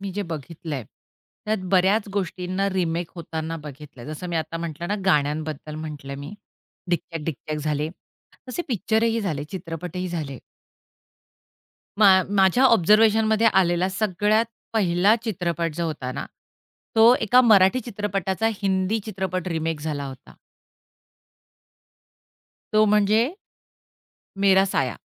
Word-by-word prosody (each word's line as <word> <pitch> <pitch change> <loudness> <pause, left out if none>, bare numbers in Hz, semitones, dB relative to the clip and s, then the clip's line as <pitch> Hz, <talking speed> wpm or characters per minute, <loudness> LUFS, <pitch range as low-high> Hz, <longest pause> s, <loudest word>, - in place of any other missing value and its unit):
मी 195 -1 -5
जे 205 - -2
बघितलंय, 160 -4 -6 0.6
त्यात 215 0 0
बऱ्याच 195 +3 +3
गोष्टींना 185 0 -2
रिमेक 170 -2 -1
होताना 165 -1 -5
बघितलंय. 145 -4 -11
जसं 155 +4 -6
मी 170 - -2
आता 160 +1 -3
म्हटलं 170 +1 -5
ना 205 - 0
गाण्यांबद्दल 150 -1 0
म्हटलं 150 -3 -7
मी. 145 +8 -8 0.6
डिक्याक 165 -2 -2
डिक्याक 155 0 -4
झाली, 150 0 -1 0.6
तसे 345 +8 -3
पिक्चर 220 0 0
ही 230 0 +1
झाले 155 -8 -3
चित्रपटही 180 0 -5
झाले. 150 -7 -5 1.6
मा 190 -3 +7
माझ्या 195 +5 +3
ऑब्झर्वेशनमध्ये 220 0 +4
आलेला 180 -1 +2
सगळ्यात 210 +3 +1 0.3
पहिला 195 +1 +3
चित्रपट 170 -6 -2
जो 170 0 -1
होता 140 -5 -4
ना, 135 - -5 0.7
तो 225 +2 +7
एका 245 +4 +5
मराठी 215 0 +5
चित्रपटाचा 205 -2 -2
हिंदी 190 +2 +1
चित्रपट 185 -4 -3
रिमेक 160 -2 -2
झाला 150 -2 -3
होता. 130 -1 -12 2.4
तो 215 0 +5
म्हणजे, 210 +1 +3 1.2
मेरा 195 -1 +6
साया. 135 - -1
180 Hz, 115 wpm, -24 LUFS, 160-205 Hz, 2.4 s, मा